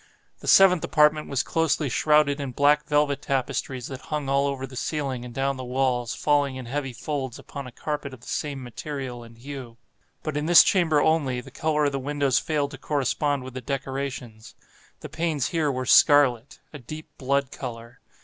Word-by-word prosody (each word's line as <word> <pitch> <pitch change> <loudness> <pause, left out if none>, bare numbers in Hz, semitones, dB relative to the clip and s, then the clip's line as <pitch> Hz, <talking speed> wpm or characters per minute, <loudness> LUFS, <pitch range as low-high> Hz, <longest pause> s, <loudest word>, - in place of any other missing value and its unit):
The - - -10
seventh 185 -3 +6
apartment 150 0 +3
was 135 - 0
closely 165 -2 0
shrouded 150 +2 +3
in 135 -3 -4
black 145 +3 +3
velvet 145 -1 +1
tapestries 130 -1 -2
that 130 -2 -7
hung 150 -3 -4
all 140 +1 +2
over 135 -1 -3
the 130 0 -12
ceiling 135 -2 -3
and 125 - -8
down 135 +2 -1
the 130 - -6
walls, 125 -2 -1
falling 145 -2 +1
in 130 -1 -7
heavy 135 +2 -3
folds 130 0 -4
upon 140 -2 -8
a - - -10
carpet 145 +2 -4
of 130 -3 -12
the - - -15
same 140 -3 -3
material 130 0 -6
and 115 0 -14
hue. 130 -2 -9 0.5
But 155 -2 -3
in 150 +1 -2
this 175 0 +9
chamber 165 -6 +3
only, 145 -6 +1
the 135 +2 -11
color 150 +1 0
of 145 - +1
the 140 - -2
windows 140 -1 +1
failed 145 -3 -1
to - - -10
correspond 145 -1 -1
with 130 -1 -9
the 130 - -6
decorations. 135 -3 -5 0.5
The - - -8
panes 160 -5 -1
here 155 -4 0
were 130 -1 -3
scarlet—a 140 +1 +3
deep 155 +6 -9
blood 140 0 0
color. 115 -1 -8
140 Hz, 190 wpm, -25 LUFS, 130-150 Hz, 0.5 s, this